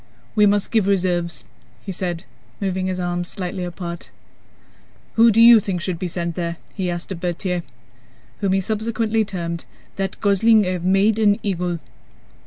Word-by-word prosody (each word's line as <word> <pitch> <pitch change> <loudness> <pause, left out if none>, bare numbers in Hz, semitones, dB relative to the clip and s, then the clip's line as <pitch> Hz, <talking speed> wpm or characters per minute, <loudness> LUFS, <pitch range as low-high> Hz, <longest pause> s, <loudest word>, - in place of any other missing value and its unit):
"We 210 -1 +5
must 205 0 +1
give 220 -4 +2
reserves," 175 -8 0 0.4
he - - -5
said, 175 -2 -3 0.4
moving 185 -2 -1
his 185 -1 -2
arms 175 0 -1
slightly 185 0 -4
apart. 175 -1 -6 1.0
"Who 230 +1 +6
do 225 0 +3
you 230 0 +9
think 190 -3 -2
should 175 -1 -3
be 185 - -2
sent 170 0 -3
there?" 170 -2 -3 0.2
he 185 -3 -2
asked 175 +2 -4
of 180 - -4
Berthier 180 0 -2 0.8
(whom 195 -2 +1
he 195 - +2
subsequently 220 +2 0
termed 170 -4 -4 0.3
"that 195 -1 -3
gosling 210 +1 +4
I - - -1
have 180 -2 -3
made 195 +4 +3
an 205 -2 +4
eagle"). 180 -3 -1
185 Hz, 165 wpm, -21 LUFS, 175-205 Hz, 1.0 s, you